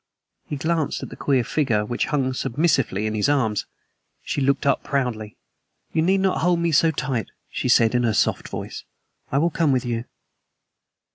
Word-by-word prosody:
He - - -3
glanced 160 +1 -1
at - - -6
the - - -9
queer 135 -4 +1
figure 115 -6 0
which 120 +3 -1
hung 135 -3 0
submissively 130 - 0
in 110 - -1
his 110 +5 +1
arms. 110 -8 +1 0.6
She - - -2
looked 140 +1 +1
up 140 - +2
proudly. 120 -6 -2 0.6
"You 160 - +2
need 190 +4 +2
not 190 -1 +1
hold 175 +1 +3
me 170 0 +1
so 160 +2 +4
tight," 130 - -2 0.2
she 125 - -2
said, 115 -2 +5
in 125 - +2
her 115 -2 +1
soft - - +1
voice. - - -6 0.5
"I 135 - +1
will 170 +4 +2
come 155 -2 +2
with 130 -1 +1
you." 120 -1 -2
135 Hz, 185 wpm, -23 LUFS, 115-155 Hz, 0.6 s, said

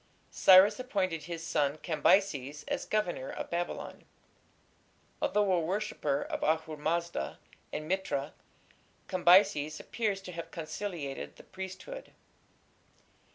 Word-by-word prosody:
Cyrus 190 +5 +7
appointed 190 -10 -1
his 165 -1 -5
son 145 -2 +1
Cambyses 150 -3 +1
as - - -2
governor 180 -11 -1
of - - -6
Babylon. 175 +1 -4 1.2
Although 205 -2 +2
a 180 - +3
worshipper 160 -5 -1
of - - -4
Ahura 160 -1 0
Mazda 170 - -1 0.3
and 155 0 -4
Mithra, 190 -6 -1 0.7
Cambyses 175 -4 +4
appears 210 -4 -2
to 185 - -7
have 170 -1 -6
conciliated 165 -3 -5
the - - -14
priesthood. 190 - -8
170 Hz, 110 wpm, -31 LUFS, 155-195 Hz, 1.2 s, Cyrus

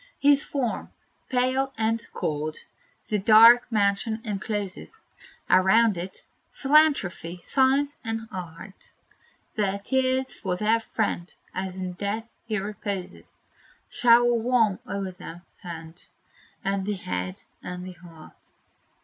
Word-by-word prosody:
His 285 0 +4
form, 255 -5 -3 0.4
pale 260 +2 +1
and 225 +1 0
cold, 155 0 -3 0.5
the 210 - +1
dark 230 +4 +7
mansion 210 +1 +1
encloses; 205 - -4 0.5
Around 200 +4 +5
it, 180 +2 -6 0.3
Philanthropy, 270 - +2
Science 270 +8 +1
and 225 -1 -4
Art 180 +2 -9 0.6
Their 200 -3 0
tears 260 +4 0
for 180 -3 -3
their 220 +3 +2
friend, 215 -5 -2 0.2
as 185 0 -4
in 185 -1 -4
death 205 +5 -3 0.2
he 215 -1 -1
reposes, 200 -2 -5 0.6
Shower 240 0 +5
warm 230 -4 +2
o'er 195 -1 -3
the 175 -1 -10 0.2
hand, 165 -1 -9 0.5
and 195 0 -1
the 210 - 0
head, 90 - -4 0.2
and 180 0 -6
the 185 - -7
heart. 170 -2 -16
210 Hz, 115 wpm, -26 LUFS, 185-240 Hz, 0.6 s, dark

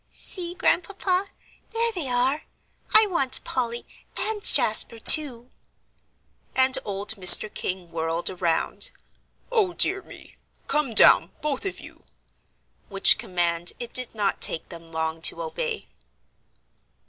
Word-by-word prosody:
"See, 350 -2 -2
Grandpapa, 370 +1 -1 0.4
there 460 +1 -2
they 350 -10 -5
are; 255 +4 -2 0.5
I 435 0 +5
want 305 -10 +1
Polly 240 -2 -5 0.3
and 435 -1 -3
Jasper, 230 - +3
too." 250 -1 +4 1.0
And 260 0 +3
old 205 +1 -3
Mr. 195 +3 +6
King 180 -2 -5
whirled 165 +1 -3
around. 175 - -3 0.6
"O 420 -7 0
dear 390 +2 +2
me! - - -16 0.3
Come 295 -7 -2
down, 170 - +5
both 295 +3 -3
of 390 - -7
you," - - -15 0.9
which 195 -1 +4
command 175 -1 -3
it 240 - -8
did 255 -2 0
not 205 -2 -2
take 160 - +2
them 170 -2 -12
long 160 0 -4
to - - +1
obey. 475 -2 -6
250 Hz, 125 wpm, -23 LUFS, -, 1.0 s, Mr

